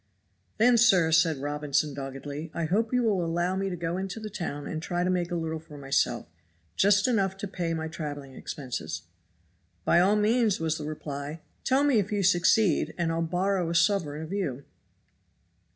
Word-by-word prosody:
"Then, 235 Hz, +2 st, +5 dB
sir," 185 Hz, -9 st, +5 dB
said 160 Hz, -1 st, +4 dB
Robinson 145 Hz, 0 st, 0 dB
doggedly, 140 Hz, +3 st, -6 dB
"I 170 Hz, -, -1 dB
hope 220 Hz, +7 st, 0 dB
you 250 Hz, -1 st, +2 dB
will 200 Hz, -6 st, +1 dB
allow 175 Hz, +2 st, 0 dB
me 195 Hz, 0 st, -1 dB
to 180 Hz, -, -3 dB
go 170 Hz, +1 st, -3 dB
into 190 Hz, +3 st, -4 dB
the 215 Hz, -1 st, -7 dB
town 155 Hz, -7 st, -4 dB
and 155 Hz, -, -4 dB
try 175 Hz, +1 st, -2 dB
and 180 Hz, +1 st, +1 dB
make 175 Hz, -1 st, -1 dB
a 175 Hz, -, -2 dB
little 160 Hz, -1 st, -2 dB
for 155 Hz, -2 st, -13 dB
myself, 135 Hz, -3 st, 0 dB, 0.5 s
just 205 Hz, +3 st, +4 dB
enough 195 Hz, -6 st, +1 dB
to 200 Hz, -, -4 dB
pay 175 Hz, -3 st, -2 dB
my 160 Hz, 0 st, -3 dB
traveling 145 Hz, -4 st, -6 dB
expenses. 125 Hz, -, -5 dB, 0.8 s
"By 170 Hz, -, +5 dB
all 195 Hz, +4 st, +4 dB
means," 215 Hz, 0 st, +2 dB
was 160 Hz, 0 st, -1 dB
the 150 Hz, -, -5 dB
reply; 150 Hz, 0 st, -6 dB, 0.2 s
"tell 265 Hz, +2 st, +3 dB
me 280 Hz, -6 st, +4 dB
if 200 Hz, +1 st, -2 dB
you 205 Hz, -1 st, 0 dB
succeed 175 Hz, -2 st, +3 dB
and 170 Hz, -2 st, 0 dB
I'll 165 Hz, 0 st, -1 dB
borrow 180 Hz, +1 st, 0 dB
a 170 Hz, -, -2 dB
sovereign 170 Hz, -5 st, +1 dB
of 160 Hz, +4 st, -7 dB
you." 140 Hz, -10 st, -3 dB
170 Hz, 185 wpm, -27 LUFS, 155-195 Hz, 0.8 s, Then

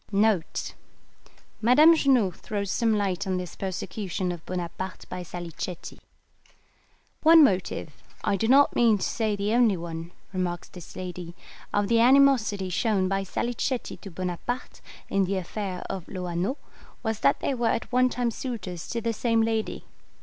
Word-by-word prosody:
[Madame 295 Hz, +9 st, +7 dB
Junot 250 Hz, -, +3 dB
throws 200 Hz, -2 st, -3 dB
some 225 Hz, -2 st, +2 dB
light 200 Hz, -1 st, -1 dB
on 185 Hz, -1 st, 0 dB
this 180 Hz, -1 st, -6 dB
Persecution 190 Hz, -1 st, -3 dB
of 170 Hz, -2 st, -7 dB
Bonaparte 185 Hz, +1 st, -5 dB
by 180 Hz, -, -5 dB
Salicetti. 175 Hz, 0 st, -7 dB, 1.2 s
"One 325 Hz, 0 st, +8 dB
motive 180 Hz, -, 0 dB, 0.2 s
(I -, -, +2 dB
do 220 Hz, +3 st, 0 dB
not 275 Hz, +4 st, +5 dB
mean 230 Hz, -3 st, +4 dB
to -, -, -4 dB
say 220 Hz, -2 st, 0 dB
the 205 Hz, +2 st, -1 dB
only 235 Hz, -5 st, +4 dB
one)," 165 Hz, 0 st, -6 dB, 0.2 s
remarks 180 Hz, -2 st, -2 dB
this 180 Hz, -2 st, -12 dB
lady, 180 Hz, -2 st, -6 dB, 0.4 s
"of 205 Hz, -1 st, +1 dB
the 230 Hz, +1 st, +3 dB
animosity 240 Hz, -7 st, +4 dB
shown 195 Hz, -1 st, +1 dB
by 195 Hz, 0 st, 0 dB
Salicetti 240 Hz, +5 st, -2 dB
to 195 Hz, -, -10 dB
Bonaparte, 185 Hz, +8 st, -4 dB, 0.3 s
in 195 Hz, -1 st, +1 dB
the 195 Hz, +1 st, -1 dB
affair 185 Hz, 0 st, -4 dB
of 190 Hz, -3 st, -5 dB
Loano, 180 Hz, -, -2 dB, 0.5 s
was 220 Hz, -2 st, -1 dB
that 140 Hz, +1 st, +3 dB
they -, -, -1 dB
were 240 Hz, -2 st, 0 dB
at 225 Hz, -, -1 dB
one 255 Hz, +1 st, +4 dB
time 245 Hz, -1 st, -1 dB
suitors 195 Hz, -9 st, -5 dB
to 235 Hz, -, -2 dB
the 230 Hz, 0 st, -1 dB
same 230 Hz, 0 st, +2 dB
lady. 225 Hz, -1 st, -2 dB
200 Hz, 150 wpm, -26 LUFS, 180-235 Hz, 1.2 s, One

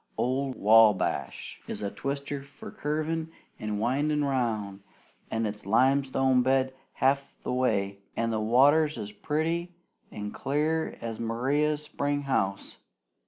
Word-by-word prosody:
"Old 130 Hz, +1 st, 0 dB
Wabash 105 Hz, -, +3 dB
is -, -, -5 dB
a 100 Hz, -, -2 dB
twister 140 Hz, 0 st, -4 dB
for 140 Hz, -, -11 dB
curvin' 155 Hz, +2 st, -2 dB, 0.3 s
and 105 Hz, -1 st, -3 dB
windin' 145 Hz, +6 st, +1 dB
round, 110 Hz, -7 st, -1 dB, 0.5 s
an' 115 Hz, 0 st, -1 dB
it's 105 Hz, 0 st, -4 dB
limestone 130 Hz, +3 st, +3 dB
bed 130 Hz, +1 st, +2 dB, 0.2 s
half 140 Hz, +1 st, 0 dB
the -, -, -2 dB
way, 100 Hz, -6 st, 0 dB, 0.2 s
an' 115 Hz, 0 st, 0 dB
the 110 Hz, -, 0 dB
water's 145 Hz, +7 st, +4 dB
as 105 Hz, 0 st, -5 dB
pretty 165 Hz, +8 st, -2 dB, 0.3 s
an' 105 Hz, 0 st, -6 dB
clear 155 Hz, +3 st, -1 dB
as 115 Hz, -1 st, -5 dB
in 115 Hz, -, -2 dB
Maria's 145 Hz, +6 st, +1 dB
springhouse. 140 Hz, -10 st, -2 dB
130 Hz, 125 wpm, -28 LUFS, 110-145 Hz, 0.5 s, water's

